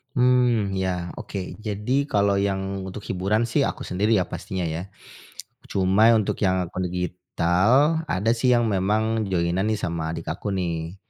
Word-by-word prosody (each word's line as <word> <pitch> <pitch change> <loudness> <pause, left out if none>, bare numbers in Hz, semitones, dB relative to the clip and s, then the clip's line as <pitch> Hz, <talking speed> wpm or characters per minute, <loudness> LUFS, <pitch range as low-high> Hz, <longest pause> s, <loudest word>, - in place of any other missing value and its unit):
Hmm 125 -4 +3
ya, 90 -2 -2
oke. 95 -2 -6
Jadi 110 +6 -1
kalau 100 -5 +2
yang 95 -1 -2
untuk 95 +2 -7
hiburan 105 +5 -1
sih, - - +2
aku - - -4
sendiri 105 +5 0
ya, 95 -4 +1
pastinya, 95 -1 -5
ya. 80 +1 -3 0.8
Cuma 100 +4 +3
ya 115 - +6
untuk 105 -3 -1
yang 95 -2 +2
akun 90 +1 -4
digital, 90 - +1
ada 105 +5 +1
sih 120 +2 0
yang 120 - +2
memang 110 +2 0
join-an 90 +3 0
nih 110 - +1
sama 85 -4 -3
adik 80 - -6
aku, 90 - -6
nih. 85 -2 -3
95 Hz, 160 wpm, -24 LUFS, 90-110 Hz, 0.8 s, ya